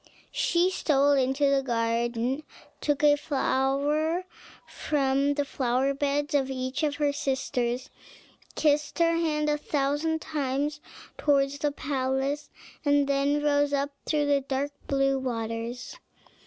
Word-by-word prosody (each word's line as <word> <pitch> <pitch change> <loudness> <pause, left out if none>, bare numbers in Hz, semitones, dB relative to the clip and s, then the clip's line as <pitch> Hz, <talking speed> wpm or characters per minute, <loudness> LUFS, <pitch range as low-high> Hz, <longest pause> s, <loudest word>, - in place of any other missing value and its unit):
She 350 +2 +2
stole 285 -5 +2
into 270 +1 +2
the 275 -1 +3
garden, 235 +2 -1 0.4
took 290 -1 0
a 295 -1 +7
flower 290 +4 0 0.4
from 280 -1 0
the 285 -1 0
flower 265 0 0
beds 285 +1 -1
of 270 -2 +2
each 260 +1 -3
of 295 -2 0
her 290 -1 +1
sisters, 255 -3 -2 0.6
kissed 295 -1 +1
her 335 -1 +3
hand 305 -2 0
a 295 0 +1
thousand 295 +2 0
times 290 -1 -2 0.4
towards 280 -1 +2
the 295 0 0
palace, 270 +1 -2 0.3
and 285 -1 +3
then 280 +1 +1
rose 290 -1 +2
up 280 0 0 0.2
through 300 -2 +1
the 285 -1 +2
dark 275 +1 -2 0.2
blue 275 -1 +2
waters. 230 -1 -4
280 Hz, 130 wpm, -27 LUFS, 265-295 Hz, 0.6 s, a